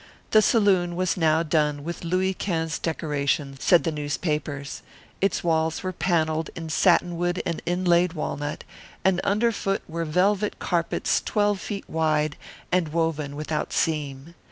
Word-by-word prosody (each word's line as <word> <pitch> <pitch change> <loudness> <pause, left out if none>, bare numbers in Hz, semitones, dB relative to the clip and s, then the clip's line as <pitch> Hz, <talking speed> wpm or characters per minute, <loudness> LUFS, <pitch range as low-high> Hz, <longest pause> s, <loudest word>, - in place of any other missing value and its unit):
The 215 - +7
saloon 190 -6 +3
was 185 0 0
now 160 -1 +3
done 150 -2 +1
with 170 +3 -5
Louis 185 +3 +1
Quinze 165 -5 -2
decorations, 145 -3 -2
said 175 - +5
the 165 - 0
newspapers. 145 -1 -3 0.4
Its 195 -1 +1
walls 160 -1 +1
were 185 0 -2
panelled 160 -3 0
in 165 -1 -6
satinwood 175 +1 +2
and 170 - -2
inlaid 175 -1 +2
walnut, 150 -2 -4 0.4
and 190 -1 +3
under 215 +4 +2
foot 195 -2 -2
were 165 +1 -3
velvet 195 +6 +1
carpets 170 -2 0
twelve 205 -2 +1
feet 200 -2 -5
wide 155 -2 +1 0.4
and 180 -2 +2
woven 155 -2 -1
without 150 +1 -3
seam. 150 -1 -1
165 Hz, 140 wpm, -25 LUFS, 155-185 Hz, 0.4 s, The